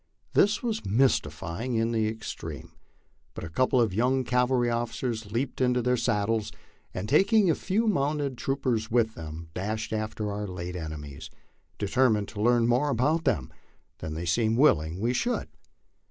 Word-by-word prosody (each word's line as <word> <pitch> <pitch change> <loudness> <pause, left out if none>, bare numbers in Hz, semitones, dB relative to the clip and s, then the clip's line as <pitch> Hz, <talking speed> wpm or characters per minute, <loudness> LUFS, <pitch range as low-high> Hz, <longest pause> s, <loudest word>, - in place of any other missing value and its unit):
This 210 +4 +3
was 225 -2 -2
mystifying 100 - 0
in 115 +1 +1
the 110 -2 +1
extreme, 110 0 -6 0.6
but - - -6
a 80 - -7
couple 130 +6 +2
of 115 -5 +2
young 130 +5 +2
cavalry 125 0 +2
officers 115 -2 -2
leaped 125 +4 -2
into 125 -1 +3
their 125 +1 +2
saddles 110 -2 0 0.4
and 95 +3 -4
taking 195 - +4
a - - +3
few 205 +8 0
mounted 145 - 0
troopers 125 -4 -1
with 115 -2 +2
them 80 -1 -8
dashed 110 +5 -3
after 110 -1 -2
our 105 +1 -3
late 90 -1 -5
enemies, 80 -2 -7 0.5
determined 105 -1 +2
to 105 - -6
learn 120 +1 +4
more 125 +5 +2
about 150 +6 +1
them 105 - 0 0.5
than 80 0 -5
they 85 +2 -4
seemed 110 +6 +1
willing 85 - +3
we 120 +4 +1
should. 240 - -1
115 Hz, 155 wpm, -27 LUFS, 100-130 Hz, 0.6 s, taking